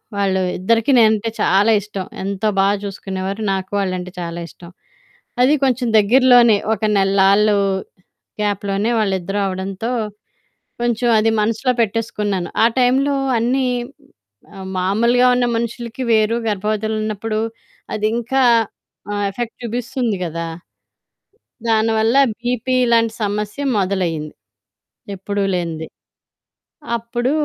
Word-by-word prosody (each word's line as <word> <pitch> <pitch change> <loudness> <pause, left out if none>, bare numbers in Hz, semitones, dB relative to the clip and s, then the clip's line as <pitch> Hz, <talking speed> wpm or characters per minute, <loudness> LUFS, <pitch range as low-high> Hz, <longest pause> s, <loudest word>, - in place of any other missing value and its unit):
వాళ్ళు 195 -2 +1 0.2
ఇద్దరికి 230 +7 +2
నేనంటే 220 0 +3
చాలా 200 +4 +3
ఇష్టం. 200 -2 -6 0.2
ఎంతో 200 +2 -2
బా 195 - +4 0.2
చూసుకునేవారు, 195 +1 -5
నాకు 190 0 -4
వాళ్ళంటే 185 -2 -3
చాలా 170 0 -5
ఇష్టం. 170 +1 -14 0.7
అది 260 +4 +5
కొంచెం 255 -1 +1
దగ్గరలోనే 240 0 +5 0.2
ఒక 215 - -5 0.2
నెళ్ళాళ్ళు 195 +2 +4 0.9
గ్యాప్‌లోనే 205 +1 -1
వాళ్ళిద్దరూ 195 -1 -1
అవడంతో 190 +5 -4 0.9
కొంచెం 240 0 0
అది 225 +1 +3
మనసులో 230 +4 +1
పెట్టేసుకున్నాను. 210 -4 -1 0.2
ఆ - - +7
టైంలో 265 +3 +3 0.2
అన్నీ, 255 +3 +1 0.9
ఆహ్, 190 -1 -8
మామూలుగా 235 +7 +3
ఉన్న 245 - +2
మనుషులకి 235 +2 -4
వేరు 220 +1 +2
గర్భవతులున్నప్పుడు 215 +1 -2 0.6
అదింకా 235 +5 0 0.7
ఆ - - -2 0.2
ఎఫెక్ట్ 230 +3 -5
చూపిస్తుంది 240 -1 -2
కదా! 165 0 -4 1.2
దానివల్ల 225 +1 +2 0.2
బీపీలాంటి 240 -2 +1
సమస్య 210 +5 -3 0.2
మొదలైింది, 180 -6 -1 0.8
ఎప్పుడూ 200 +1 -3
లేంది. 165 -2 -3 1.1
అప్పుడు 240 +3 -2
215 Hz, 100 wpm, -19 LUFS, 195-235 Hz, 1.2 s, ఆ